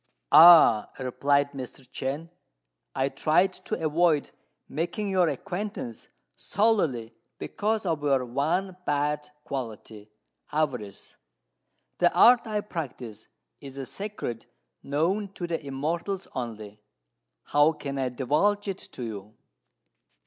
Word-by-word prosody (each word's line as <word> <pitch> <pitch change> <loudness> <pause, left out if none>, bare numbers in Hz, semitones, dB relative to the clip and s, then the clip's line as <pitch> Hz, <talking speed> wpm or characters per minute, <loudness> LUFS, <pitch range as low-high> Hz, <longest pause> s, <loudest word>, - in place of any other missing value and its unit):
"Ah," 160 -10 +8
replied 140 +2 +1
Mr. 135 -1 -8
Chên, 140 +6 -4 0.6
"I 135 - +1
tried 175 +7 +2
to - - -4
avoid 155 -1 +2 0.4
making 175 +7 -3
your 185 -3 +3
acquaintance 180 - -5 0.3
solely 165 - 0 0.2
because 215 0 -2
of 165 -4 -1
your 135 -3 +1
one 170 +9 -1
bad 150 -1 -1
quality 110 -5 -7 0.4
avarice. 125 -10 -3 0.9
The - - +4
art 240 -1 +6
I 210 -1 -1
practise 130 - -7 0.3
is 135 -1 -10
a 135 - -4
secret 195 - -5 0.3
known 185 +8 -1
to 175 - -5
the 165 -2 -3
Immortals 165 +8 -3
only: 110 -4 -6 0.6
how 145 +2 +4
can 140 -2 -5
I 130 -1 0
divulge 155 +12 +1
it 195 -1 -3
to 125 - -6
you?" 105 -1 -7
145 Hz, 115 wpm, -27 LUFS, 130-180 Hz, 0.9 s, Ah